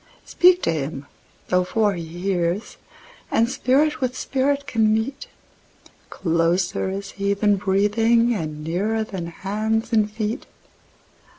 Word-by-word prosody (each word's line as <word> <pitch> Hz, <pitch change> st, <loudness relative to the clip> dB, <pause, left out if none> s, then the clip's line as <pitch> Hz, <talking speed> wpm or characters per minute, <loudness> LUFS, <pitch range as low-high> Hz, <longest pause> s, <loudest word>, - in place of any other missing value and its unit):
Speak 360 Hz, 0 st, +4 dB
to -, -, +2 dB
Him 145 Hz, -2 st, -4 dB, 0.4 s
thou 180 Hz, 0 st, +3 dB
for 210 Hz, +2 st, +1 dB
He 170 Hz, -2 st, -5 dB
hears, 175 Hz, +3 st, -2 dB, 0.5 s
and 230 Hz, -, +2 dB
Spirit 275 Hz, +5 st, +1 dB
with 255 Hz, 0 st, -1 dB
Spirit 280 Hz, +1 st, 0 dB
can 220 Hz, -4 st, +2 dB
meet—Closer 190 Hz, -7 st, -3 dB
is 195 Hz, +1 st, -5 dB
He 200 Hz, 0 st, -1 dB
than 205 Hz, 0 st, +2 dB
breathing, 225 Hz, +5 st, +2 dB
and 155 Hz, -6 st, -4 dB
nearer 205 Hz, +7 st, -1 dB
than 190 Hz, -6 st, -6 dB
hands 215 Hz, +6 st, -2 dB
and 215 Hz, -2 st, +3 dB
feet. 220 Hz, +3 st, -3 dB
205 Hz, 120 wpm, -22 LUFS, 180-230 Hz, 0.5 s, Speak